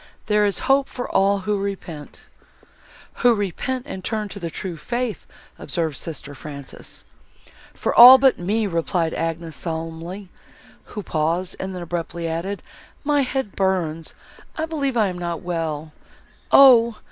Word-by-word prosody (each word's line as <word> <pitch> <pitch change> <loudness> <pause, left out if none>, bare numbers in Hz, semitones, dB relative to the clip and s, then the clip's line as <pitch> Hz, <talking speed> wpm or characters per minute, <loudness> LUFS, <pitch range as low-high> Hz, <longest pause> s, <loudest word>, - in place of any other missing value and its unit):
There 210 -1 +3
is 200 - -1
hope 275 -2 +3
for 245 - -5
all 195 +1 +2
who 205 +1 -1
repent!" 180 -7 -7 0.9
"Who 245 -1 +4
repent 230 +6 -3
and 190 -10 -7
turn 215 -1 -2
to 200 - -7
the 170 -3 -4
true 180 +1 -6
faith," 240 +7 -4 0.3
observed 160 -4 -2
sister 145 -2 -6
Frances. 140 -1 -9 0.7
"For - - -1
all 250 +2 +11
but 265 0 +3
me!" 210 +5 0
replied 170 -2 -1
Agnes 165 -1 -3
solemnly, 165 +4 -6 0.6
who 210 - -7
paused, 165 +4 -1
and 190 0 -5
then 180 - -5
abruptly 170 0 -4
added, 170 +5 -4 0.4
"My 290 -1 +2
head 265 -5 -2
burns, 170 -5 -1 0.4
I 315 - -1
believe 280 -6 -2
I 220 - +4
am 180 -1 -6
not 170 -1 -4
well. 160 -3 -3 0.6
O! 235 -5 +7
190 Hz, 145 wpm, -22 LUFS, 165-225 Hz, 0.9 s, all